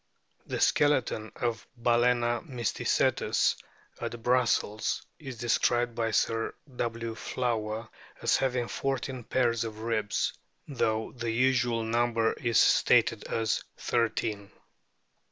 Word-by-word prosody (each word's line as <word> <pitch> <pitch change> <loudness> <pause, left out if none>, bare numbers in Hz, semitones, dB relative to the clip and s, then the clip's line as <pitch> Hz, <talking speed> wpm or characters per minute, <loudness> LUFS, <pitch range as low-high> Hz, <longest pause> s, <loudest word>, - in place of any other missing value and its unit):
The - - -3
skeleton 135 -7 +2
of 115 -2 -2
Balcena 120 0 +2
o - - -8
mysticelus 125 - +1 0.4
at 120 -1 -5
Brussels 120 -3 +1
is 135 -6 -8
described 120 0 +1
by 115 -1 -1
Sir 115 +1 0 0.2
W. 115 -1 -3
Flower 115 -2 -2 0.3
as - - +2
having 125 -2 0
fourteen 135 -1 -3
pairs 120 -1 +1
of 110 -1 -6
ribs, 110 -3 0 0.3
though 110 -5 -1
the 120 -2 -4
"usual" 125 -1 +2
number 115 0 +1
is 115 -2 +1
stated - - +4
at 110 -1 0 0.2
thirteen. 110 -3 -1
120 Hz, 110 wpm, -29 LUFS, 115-125 Hz, 0.4 s, stated